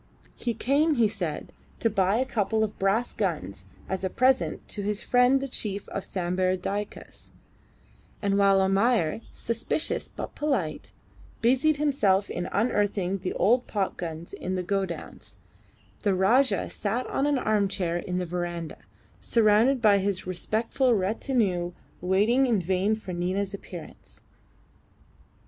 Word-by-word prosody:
He 235 -2 -3
came, 290 +7 +2
he 235 -4 +4
said, 180 -8 -5 0.3
to - - +2
buy 200 -2 +2
a 255 +3 +1
couple 220 -3 0
of 215 -1 -4
brass 200 +5 +1
guns 100 - -3 0.2
as 190 0 -3
a 190 - 0
present 260 +5 +1
to 205 - -3
his 205 0 -1
friend 250 +2 +4
the 275 - -3
chief 205 -5 -2
of 195 - -4
Sambir 185 0 0
Dyaks; 200 +3 -6 0.9
and 200 -2 0
while 200 -1 +5
Almayer, 195 -1 +2
suspicious 235 +7 -2
but - - -7
polite, 270 - -2 0.5
busied 265 +6 +3
himself 210 -10 +2
in 175 - -3
unearthing 200 -3 0
the 180 0 -3
old 245 +6 +2
popguns 170 -5 -3
in 185 +1 -4
the 185 - -2
godowns, 190 -2 -4 0.7
the 200 -3 +2
Rajah 235 +9 +3
sat 225 +5 -2
on 280 - 0
an 290 -1 +2
armchair 200 -6 0
in 180 +1 -3
the 180 - -1
verandah, 175 -1 -4 0.4
surrounded 230 +3 +3
by 205 -2 +6
his 195 -1 -2
respectful 225 +7 0
retinue 190 -3 0 0.3
waiting 210 +9 +3
in 230 -5 +2
vain 190 +4 +1
for 205 -4 -7
Nina's 185 +3 -1
appearance. 180 -3 -10
200 Hz, 135 wpm, -27 LUFS, 185-235 Hz, 0.9 s, by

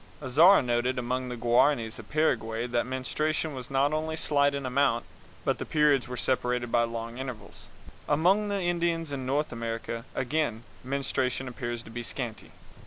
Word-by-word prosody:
Azara 155 +7 +6
noted 125 +1 0
among 125 +1 -2
the 125 - -5
Guaranis 120 -1 +2
of 110 - -11
Paraguay 115 -7 +1
that 120 0 -1
menstruation 150 +4 -1
was 130 -2 -7
not 140 +2 +2
only 160 +1 -1
slight 145 -2 +2
in 140 -1 -4
amount, 135 +2 +2 0.4
but - - +1
the - - -2
periods 150 -4 +3
were 125 0 -5
separated 125 -2 0
by 120 - +4
long 115 +1 -3
intervals. 130 -4 -7 0.4
Among 185 +8 +3
the 200 -1 -1
Indians 170 -2 0
in 130 -2 -4
North 145 +3 0
America, 115 0 -4
again, 135 -3 -1 0.2
menstruation 130 -1 -1
appears 120 -1 -4
to 115 - -12
be 120 +1 -4
scanty. 120 -1 -5
130 Hz, 165 wpm, -28 LUFS, 120-150 Hz, 0.4 s, Azara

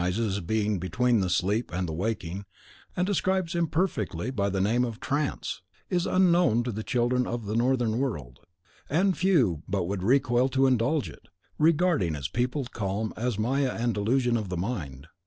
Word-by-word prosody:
rightly 90 - +1
recognises 110 -4 0
as - - -4
being 105 +2 0
between 115 +7 +1
the 95 -2 0
sleep 100 +6 0
and 90 +1 -2
the 80 - -4
waking, 95 0 -3 0.5
and 180 - +2
describes 190 -3 0
imperfectly 160 - -1
by 100 -6 0
the 95 0 -1
name 115 +6 +2
of 115 -2 -4
TRANCE, 140 -6 -2 0.3
is 175 -1 +1
unknown 175 -10 +3
to 120 - -3
the 110 0 -4
children 125 +1 +1
of 115 -2 -4
the 105 +2 -3
Northern 120 -1 +1
world; 75 - -3 0.5
and 185 +5 +2
few 130 - +2
but 95 -1 0
would 95 +2 -3
recoil 125 +3 +3
to 135 +1 +2
indulge 130 +4 +2
it, - - -13 0.3
regarding 155 - +3
its 70 -2 -3
peopled 125 +1 -2
calm 105 +1 -2
as 120 -1 -2
maya 130 +4 +1
and 120 0 +1
delusion 120 +4 +1
of 105 -4 -4
the 90 - -3
mind. 80 - -4
120 Hz, 180 wpm, -27 LUFS, 100-135 Hz, 0.5 s, unknown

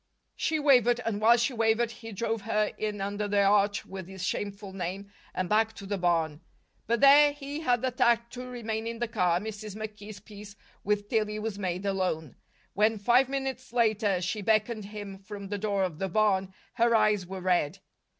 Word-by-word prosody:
She 320 - 0
wavered, 245 -5 +4
and 215 -2 -2
while 235 +2 +6
she 240 +3 0
wavered 225 0 +1
he 225 0 -10
drove 225 +2 -2
her 210 0 0
in 210 -2 -3
under 205 +1 -2
the 200 0 +2
arch 205 0 +2
with 190 -2 -8
the 190 0 -10
shameful 200 +1 -4
name, 195 +2 -5 0.2
and 185 - -2
back 220 +3 +2
to 200 - -10
the 200 0 -3
barn. 165 -3 0 0.5
But 235 0 +1
there 290 +1 +7
he 285 +1 -6
had 245 -6 +1
the 260 - +1
tact 235 -1 +2
to 250 0 -7
remain 225 -2 -4
in 230 0 -4
the 240 +1 -2
car, 180 -7 +1
and 195 - -5
Mrs. 215 -1 -6
McKee's 215 -1 -8
peace 205 0 -12 0.3
with 205 0 0
Tillie 215 -2 0
was 215 -1 -4
made 185 0 -3
alone. 185 -7 -2 0.4
When, 215 +2 +2
five 245 +6 +3
minutes 265 -2 -4
later, 215 -5 +2
she 205 +4 -2
beckoned 215 +1 +1
him 205 -2 -8
from 200 0 -9
the 205 0 -3
door 200 -2 0
of 175 -5 -3
the 195 - -2
barn, 195 -1 +1 0.2
her 235 -1 +3
eyes 210 -4 +2
were 190 0 -6
red. 180 -2 +1
210 Hz, 195 wpm, -28 LUFS, 195-230 Hz, 0.5 s, there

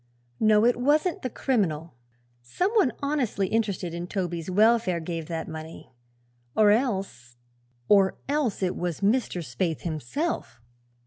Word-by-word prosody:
No; 215 0 +4
it 245 - +3
wasn't 300 +7 +1
the 255 - -3
criminal. 175 - -1 0.5
Some 355 - -1
one 410 - +3
honestly 255 -10 0
interested 200 -6 -1
in 170 +1 -5
Toby's 175 -3 -3
welfare 215 -2 +3
gave 165 -1 -5
that 165 -1 -4
money, 160 0 -9 0.6
or 210 -1 +5
else 195 - -1 0.5
or 195 -2 +4
else 275 -9 0
it 180 - 0
was 175 -1 -3
Mr. 200 -4 +1
Spaythe 155 +6 -2
himself!" 160 - -3
195 Hz, 130 wpm, -26 LUFS, 165-240 Hz, 0.6 s, or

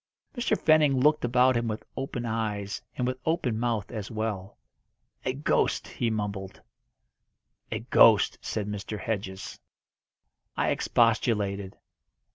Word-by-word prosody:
Mr. 245 - +1
Fenning 150 -4 +4
looked 150 +3 +3
about 125 +1 +4
him 120 0 0
with 110 0 -3
open 130 -3 -4
eyes, 105 -3 -2 0.2
and 125 - 0
with 130 +1 -2
open 150 -9 0
mouth 115 -4 -1
as 105 -4 -5
well. 110 -4 -4 0.7
"A 130 - 0
ghost!" 140 +3 0
he 120 - -1
mumbled. 100 -3 -4 1.1
"A - - -2
ghost!" - - +5
said 105 -2 -3
Mr. 105 +1 -5
Hedges. 100 -4 -4 1.0
I - - +2
expostulated. 105 -4 +1
115 Hz, 120 wpm, -27 LUFS, 105-125 Hz, 1.1 s, ghost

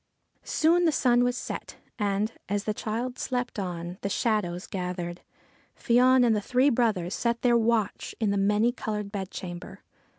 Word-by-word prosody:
Soon 340 +3 +3
the 325 - +4
sun 245 -4 +3
was 245 0 0
set, - - -6 0.2
and, 205 +1 0 0.2
as 205 0 0
the 215 - -1
child 235 +4 -3
slept 250 -3 -2
on 180 -3 -3
and 175 +2 -7
the 200 - -2
shadows 195 -5 0
gathered, 180 -2 -4 0.6
Fion 250 +1 +4
and 225 -2 +3
the 210 - 0
three 255 +6 +3
brothers 215 -7 +1
set 235 0 -1
their 240 -1 +4
watch 230 -3 0
in 215 -3 +1
the - - 0
Many 210 +4 +3
coloured 210 -4 -4
Bedchamber. 185 -3 -6
215 Hz, 165 wpm, -27 LUFS, 195-245 Hz, 0.6 s, the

